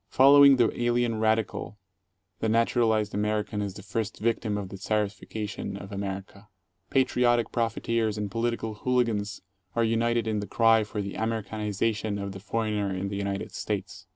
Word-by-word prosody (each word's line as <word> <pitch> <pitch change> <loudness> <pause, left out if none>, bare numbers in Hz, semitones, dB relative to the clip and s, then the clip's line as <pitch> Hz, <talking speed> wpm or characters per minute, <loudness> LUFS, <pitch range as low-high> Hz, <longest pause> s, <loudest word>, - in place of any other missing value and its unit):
Following 140 +1 +8
the 120 -3 +3
"alien 120 -2 +1
radical," 110 -1 0 0.6
the 110 - 0
naturalized 110 -2 +2
American 105 0 -1
is 100 -2 -4
the 100 - -9
first 110 +1 -3
victim 110 -1 0
of 100 -2 -5
the 95 - -8
Czarification 105 0 -3
of 100 0 -10
America. 100 +1 -6 0.4
Patriotic 125 -3 +2
profiteers 115 -1 0
and 105 -2 -3
political 115 0 -1
hooligans 115 -6 0 0.3
are 115 - +2
united 115 +1 +1
in 110 -1 0
the 100 - -5
cry 115 +2 +4
for 105 -1 -4
the 100 - -5
"Americaniza 110 -1 -1
tion" 105 -1 -3
of 100 -1 -4
the 95 - -8
foreigner 105 -1 -1
in 95 +1 -3
the 100 - -4
United 100 0 -3
States. 95 -3 -4
110 Hz, 155 wpm, -27 LUFS, 100-115 Hz, 0.6 s, Following